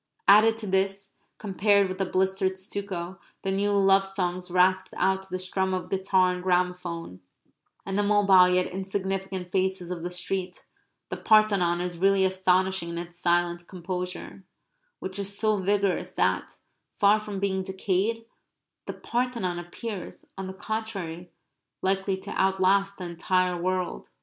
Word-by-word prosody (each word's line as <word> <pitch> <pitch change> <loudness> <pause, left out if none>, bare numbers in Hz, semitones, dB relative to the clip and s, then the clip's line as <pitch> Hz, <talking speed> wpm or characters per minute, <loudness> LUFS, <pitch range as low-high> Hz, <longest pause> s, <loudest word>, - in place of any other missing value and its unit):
Added 215 +3 +7
to 225 - -7
this, 195 0 -1 0.3
compared 200 0 +2
with 185 +1 -6
the 195 - 0
blistered 190 0 0
stucco, 190 -1 -5 0.2
the 195 - 0
new 200 +1 +1
love 195 0 +5
songs 185 -2 -3
rasped 185 +1 +2
out 190 0 +2
to 190 - -16
the 185 - -2
strum 185 0 -1
of 180 0 -5
guitar 190 -1 +2
and 180 - -5
gramophone, 180 - -1 0.7
and 195 - -3
the - - +4
mobile 200 -3 +5
yet 180 0 +2
insignificant 190 -1 -4
faces 190 -2 -1
of 175 -2 -4
the 175 - -3
street, 180 +1 -4 0.4
the - - -4
Parthenon 200 -6 +3
is 175 -1 -4
really 195 0 +4
astonishing 190 -1 +1
in 170 - -5
its 175 0 -7
silent 175 0 +1
composure; 180 +1 -6 0.5
which 190 +1 -6
is 200 0 -4
so 215 -1 +2
vigorous 195 -2 0
that, 95 0 0 0.4
far 205 +2 +5
from 210 -2 -6
being 190 -1 0
decayed, 195 +4 -1 0.6
the - - -3
Parthenon 235 -8 -2
appears, 185 +2 -7
on 190 -1 -5
the 190 - -6
contrary, 190 -5 -5 0.5
likely 195 0 +1
to 190 - -9
outlast 195 +1 +2
the 185 - -7
entire 180 +1 0
world. 175 - -2
190 Hz, 150 wpm, -26 LUFS, 180-195 Hz, 0.7 s, Added